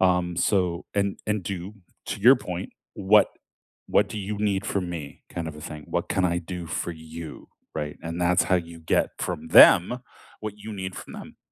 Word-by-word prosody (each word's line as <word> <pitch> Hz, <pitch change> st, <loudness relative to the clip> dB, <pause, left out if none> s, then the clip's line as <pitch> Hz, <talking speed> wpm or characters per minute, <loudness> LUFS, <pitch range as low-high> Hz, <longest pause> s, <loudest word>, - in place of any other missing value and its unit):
um, 90 Hz, -1 st, +2 dB
so, 90 Hz, -2 st, +1 dB
and 100 Hz, -1 st, 0 dB
and 105 Hz, -2 st, 0 dB
do 95 Hz, +1 st, -5 dB, 0.3 s
to -, -, -4 dB
your 125 Hz, +6 st, +8 dB
point, 90 Hz, -6 st, -5 dB, 0.2 s
what 105 Hz, +1 st, +5 dB, 0.6 s
what -, -, +3 dB
do 105 Hz, -, -5 dB
you 105 Hz, +1 st, -3 dB
need 100 Hz, -1 st, 0 dB
from 90 Hz, -5 st, -1 dB
me 75 Hz, -5 st, -7 dB
kind 85 Hz, -2 st, -4 dB
of 75 Hz, -, -8 dB
a -, -, -10 dB
thing, 75 Hz, -1 st, -8 dB
"What -, -, -2 dB
can 95 Hz, -, +1 dB
I 85 Hz, -, 0 dB
do 85 Hz, 0 st, -6 dB
for 85 Hz, -, -3 dB
you?" 80 Hz, 0 st, -9 dB, 0.3 s
right, 75 Hz, 0 st, -4 dB
and 85 Hz, +1 st, -4 dB
that's 90 Hz, 0 st, +3 dB
how 90 Hz, -, +3 dB
you 85 Hz, -1 st, -6 dB
get 80 Hz, -, +1 dB
from 80 Hz, +1 st, -4 dB
them 105 Hz, +10 st, +7 dB, 0.4 s
what 110 Hz, -1 st, -5 dB
you 110 Hz, +1 st, -7 dB
need 95 Hz, -1 st, -5 dB
from -, -, -9 dB
them. -, -, -10 dB
90 Hz, 200 wpm, -25 LUFS, 85-100 Hz, 0.6 s, your